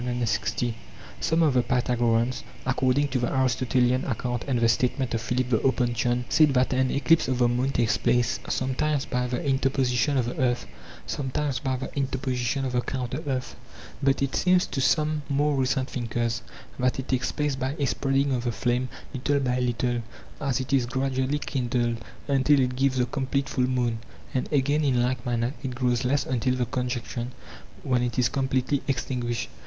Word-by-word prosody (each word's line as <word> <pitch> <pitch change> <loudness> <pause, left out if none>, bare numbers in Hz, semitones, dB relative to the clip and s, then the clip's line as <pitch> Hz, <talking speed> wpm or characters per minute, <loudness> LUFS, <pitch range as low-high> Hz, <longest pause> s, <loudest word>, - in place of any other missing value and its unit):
Some 165 +1 +2
of 150 -4 +3
the 125 - +4
Pythagoreans 120 -1 +1 0.2
(according 130 +2 +2
to 130 -1 0
the 120 - -1
Aristotelian 130 0 +2
account 120 -1 -2
and 130 -3 +1
the 115 - +4
statement 125 +2 +1
of 115 - 0
Philip 125 +2 -1
the 110 - +4
Opuntian) 125 -1 +1
said 150 -4 +4
that 125 +1 +3
an 130 0 +2
eclipse 140 +4 +3
of 130 -1 0
the 120 -1 +4
moon 125 +3 +1
takes 120 -4 +1
place, 120 -4 +2
sometimes 135 +2 0
by 125 -1 -1
the 125 +2 -3
interposition 135 -1 +1
of 125 - +2
the 120 - -4
earth, 125 - +1 0.4
sometimes 135 - -2
by 130 -3 -1
the 135 - -7
interposition 130 -1 -1
of 130 - -2
the 125 0 +1
counter 125 +1 -3
earth 130 -2 -2
[avrivyOov]. - - -17
But 135 -1 +2
it 135 - -1
seems 180 0 +3
to 135 - -3
some 155 +2 +2
more 145 +1 +2
recent 130 0 0
thinkers 115 -2 -2 0.4
that 125 0 +1
it 130 - -4
takes 130 -1 0
place 150 -2 -1
by 130 +2 -2
a 145 - +1
spreading 135 +1 +1
of 125 -1 -1
the 120 - +1
flame 125 +2 0 0.2
little 140 +2 +1
by 125 -2 0
little 120 -1 0 0.4
as 135 -4 0
it 130 +1 -3
is 130 -3 +3
gradually 130 +2 0
kindled, 120 -4 -1 0.3
until 140 +1 +4
it 125 -1 +1
gives 135 0 +1
the 125 - +3
com 130 +1 -3
plete 140 +1 0
full 130 -1 +1
moon, 120 -3 0 0.3
and 130 - -2
again, 145 +1 +2
in 125 -4 +2
like 125 0 -1
manner, 120 +1 0
it 130 -2 -4
grows 125 -1 +1
less 135 +2 +1
until 125 0 0
the 125 -1 0
conjunction, 125 0 -3 0.5
when 125 -2 +1
it 120 -2 -2
is 125 -1 +3
completely 135 +1 0
extin 125 -1 -1
guished. 120 -1 -2
130 Hz, 185 wpm, -26 LUFS, 125-135 Hz, 0.5 s, the